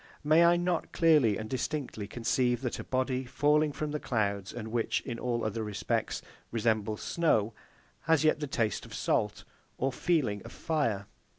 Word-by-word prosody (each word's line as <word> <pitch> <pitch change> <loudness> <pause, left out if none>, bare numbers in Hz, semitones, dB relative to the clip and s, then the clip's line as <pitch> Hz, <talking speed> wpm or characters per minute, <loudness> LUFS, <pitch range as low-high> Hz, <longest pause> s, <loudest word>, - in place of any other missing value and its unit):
May 155 +3 +5
I 170 0 +6
not 175 0 -1
clearly 150 - +4
and 110 - -5
distinctly 130 -4 -3
conceive 125 +2 0
that 125 -3 -3
a - - -4
body, 130 0 -1
falling 145 +4 +2
from 150 +1 -4
the 150 - -2
clouds, 100 -6 -1
and 110 -2 -6
which, 115 0 0
in 120 -3 -5
all 120 -2 -1
other 110 +1 -2
respects, 105 -2 -2 0.3
resembles 110 -2 0
snow, 115 -10 +1 0.5
has 160 -1 +4
yet 155 -1 +3
the 150 - -3
taste 115 -5 -1
of - - -9
salt - - 0 0.3
or 135 0 0
feeling 125 - +1
of - - -10
fire? 115 -11 -1
125 Hz, 170 wpm, -30 LUFS, 110-150 Hz, 0.5 s, I